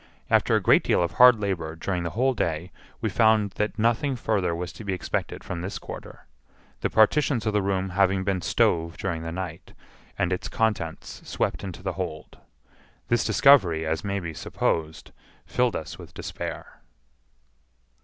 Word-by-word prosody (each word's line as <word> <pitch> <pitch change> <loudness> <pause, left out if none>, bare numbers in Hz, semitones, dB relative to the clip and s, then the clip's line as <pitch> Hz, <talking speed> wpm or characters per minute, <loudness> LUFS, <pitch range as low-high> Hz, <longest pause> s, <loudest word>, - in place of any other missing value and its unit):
After - - +4
a - - +4
great - - +5
deal - - +2
of 85 - -1
hard 125 -2 +7
labor 85 -6 -2
during 90 +2 -2
the 85 - -2
whole 130 +2 +3
day, 85 -5 -2 0.3
we - - 0
found 110 -3 +3
that 105 0 -1
nothing 120 +5 +1
further 100 -8 0
was 90 +1 -5
to - - -10
be 100 -2 -2
expected 90 - -3
from 85 -2 -5
this 95 +3 -4
quarter, - - -10 0.5
the - - -1
partitions 115 +1 +3
of 110 - 0
the 105 - +2
room 95 -1 -1
having 95 0 +2
been 95 -1 -1
stove 85 0 +1
during 85 -4 -3
the 80 0 -5
night, 90 -1 -6 0.4
and 90 +1 +1
its 90 - -4
contents 105 -8 -2
swept - - -1
into 95 -2 -7
the 95 -2 -2
hold. 85 -4 -6 0.7
This 120 0 +2
discovery, 95 - +5
as 80 +1 -1
may 100 0 -1
be 85 -3 -5
supposed, 80 +1 -2 0.3
filled 125 -3 +1
us 80 - -6
with - - -12
despair. - - -7
95 Hz, 170 wpm, -25 LUFS, 85-110 Hz, 0.7 s, hard